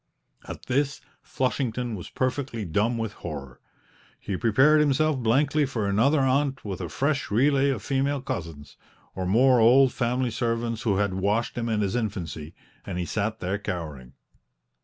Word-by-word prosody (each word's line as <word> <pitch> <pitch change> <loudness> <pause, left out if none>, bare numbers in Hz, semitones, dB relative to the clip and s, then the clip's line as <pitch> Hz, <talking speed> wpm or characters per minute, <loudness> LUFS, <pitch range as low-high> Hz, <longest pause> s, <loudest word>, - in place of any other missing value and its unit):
At - - -8
this 140 +2 0 0.2
Flushington 125 -3 -2
was 90 -5 -7
perfectly 130 -4 -2
dumb 105 +8 0
with 115 -2 -3
horror; 70 -6 -8 0.6
he 100 - -4
prepared 130 +10 +4
himself 150 0 +2
blankly 140 +6 +2
for 115 -7 -2
another 130 +9 +3
aunt 135 -1 +1
with 95 -3 -4
a - - -4
fresh 145 +1 -1
relay 140 +5 +3
of 130 -6 -2
female 140 +1 0
cousins, 85 - -6 0.4
or 95 -1 -3
more 125 +5 +4
old 125 +3 +6
family 125 0 0
servants 115 -1 -2
who 100 -4 +1
had 100 -1 0
washed 100 +5 0
him 115 -1 -2
in 110 -2 0
his 100 +1 -1
infancy, 85 - -4 0.3
and 90 - -5
he 90 - -2
sat 110 +4 -2
there 95 +3 -2
cowering. 75 -10 -6
115 Hz, 160 wpm, -26 LUFS, 100-135 Hz, 0.6 s, old